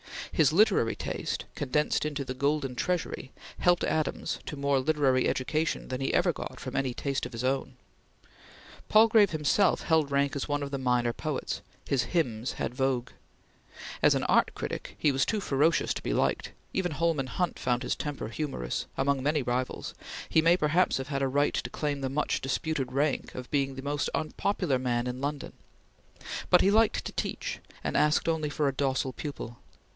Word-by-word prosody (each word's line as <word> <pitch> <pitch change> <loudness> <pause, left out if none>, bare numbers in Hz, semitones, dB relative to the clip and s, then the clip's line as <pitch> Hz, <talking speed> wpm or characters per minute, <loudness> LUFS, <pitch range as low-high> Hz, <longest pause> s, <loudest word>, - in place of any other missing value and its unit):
His 155 -2 +4
literary 190 - +4
taste, - - -3
condensed 150 +2 0
into 145 -2 -2
the 130 - -4
"Golden 140 0 0
Treasury," 165 -2 -2 0.3
helped 175 -1 +3
Adams 155 -2 -1
to - - -4
more 140 -1 +1
literary 135 -2 +2
education 155 +4 -1
than 130 0 -3
he 135 - 0
ever - - +3
got - - -7
from - - -6
any 135 -2 0
taste 135 -3 -2
of 125 - -15
his 115 +1 -4
own. 130 0 -1 1.1
Palgrave 215 -1 +6
himself 160 +5 +2
held 160 -3 +2
rank 140 0 +1
as 140 - -2
one 145 -1 -1
of 140 - -5
the 140 - -2
minor 125 -2 +1
poets; 150 +1 -3 0.3
his 135 -3 +2
hymns 120 -5 -1
had - - -3
vogue. 130 -2 0 0.9
As - - +5
an - - 0
art - - +3
critic - - -5
he 150 - +3
was 135 0 +2
too 215 - 0
ferocious 150 +1 +2
to - - -6
be - - -2
liked; - - 0 0.2
even 180 -4 0
Holman 150 -3 0
Hunt 180 +6 -2
found 125 0 0
his - - 0
temper 145 -6 -4
humorous; 115 - -3
among 135 0 +1
many 150 +1 +1
rivals, 125 +1 -2 0.3
he 160 - +4
may 170 +2 +5
perhaps 170 +3 +2
have 135 +1 -5
had 135 -2 -1
a 135 - +2
right 145 +2 +2
to - - -2
claim 145 -2 -2
the 135 - -1
much 150 +3 0
disputed 135 0 -1
rank 140 +2 0
of 125 -1 -7
being 135 -2 +1
the 135 - -7
most 145 +1 -1
unpopular 155 -3 0
man 120 -1 0
in 125 +1 -4
London; 145 0 -3 1.0
but 180 - +6
he 195 - +4
liked 220 +1 +3
to - - -4
teach, - - -3 0.2
and - - -2
asked 150 +2 +3
only 160 -2 0
for 145 0 0
a 135 - +1
docile 135 -1 0
pupil. 120 -5 -6
140 Hz, 185 wpm, -29 LUFS, 130-155 Hz, 1.1 s, Palgrave